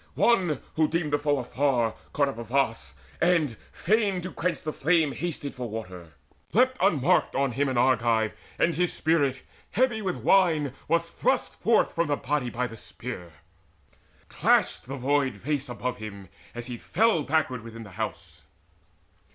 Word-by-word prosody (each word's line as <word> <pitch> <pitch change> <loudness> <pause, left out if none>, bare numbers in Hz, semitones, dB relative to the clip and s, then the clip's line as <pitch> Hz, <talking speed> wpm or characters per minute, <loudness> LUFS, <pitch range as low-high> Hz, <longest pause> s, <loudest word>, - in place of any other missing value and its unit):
One, 180 - +3 0.2
who 155 -1 +4
deemed 160 -3 -1
the 145 - +3
foe 145 0 +1
afar, 125 -2 +1 0.2
Caught 140 -1 +2
up 135 - -6
a - - -4
vase, 115 - -1 0.3
and, 165 -8 +3 0.2
fain 205 -1 +1
to 185 +1 -6
quench 180 +1 -2
the 155 - -3
flame, 160 0 +2
Hasted 145 -2 -4
for 125 -3 -5
water. 90 -7 -7 0.4
Leapt 255 +4 +4
unmarked 160 -9 +3
on 135 -1 +1
him 140 +3 0
An 130 - -1
Argive, 115 -3 +3 0.3
and 170 - +2
his 175 +1 +1
spirit, 145 -5 +1 0.3
heavy 240 -3 +1
with 185 -3 -2
wine, 160 -8 +3
Was 170 +1 +1
thrust - - 0
forth - - +2
from 170 0 +1
the 145 -1 0
body 140 -3 -1
by 125 +1 -2
the 115 -2 -7
spear. 110 -8 -8 1.0
Clashed - - +2
the 135 - -4
void 135 +1 +1
vase 140 +5 -2
above 125 0 -3
him, 100 -3 -8 0.3
as 120 0 -5
he 120 -1 -6
fell 215 - +2
Backward 140 -5 0
within 115 0 -9
the 100 - -12
house. 110 +3 -6
140 Hz, 165 wpm, -27 LUFS, 120-165 Hz, 1.0 s, who